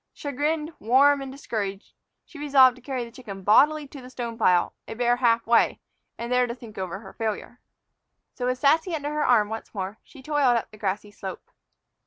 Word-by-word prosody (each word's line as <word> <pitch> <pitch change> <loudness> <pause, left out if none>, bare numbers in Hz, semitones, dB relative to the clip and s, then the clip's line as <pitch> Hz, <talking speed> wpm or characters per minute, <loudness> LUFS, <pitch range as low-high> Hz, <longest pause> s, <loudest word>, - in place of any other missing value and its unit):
Chagrined, 300 +3 -2
warm, 275 +5 +4
and 270 -1 -6
discouraged, 205 -7 -5 0.3
she 315 - -13
resolved 270 -4 +5
to 255 - -17
carry 255 -1 -3
the 235 - -12
chicken 210 -6 -9
bodily 295 +9 +4
to 275 - -10
the 250 - -11
stone 240 -2 -5
pile, 180 -6 +2
a - - -6
bare 245 +1 +2
half 235 -2 +2
way, 235 0 +3 0.4
and 235 +1 -5
there 250 0 +3
think 230 -5 -11
over 190 +1 -4
her 190 -3 -12
failure. 225 +2 -4 0.7
So, 250 - -3
with 255 0 0
Sassy 320 +6 +2
under 295 -1 -3
her 300 0 0
arm 225 -4 +4
once 225 0 -7
more, 195 +2 -4
she 275 -4 -16
toiled 280 -4 +2
up 230 - -4
the 215 - -14
grassy 205 +1 -3
slope. 195 -2 -8
245 Hz, 195 wpm, -25 LUFS, 215-280 Hz, 0.7 s, resolved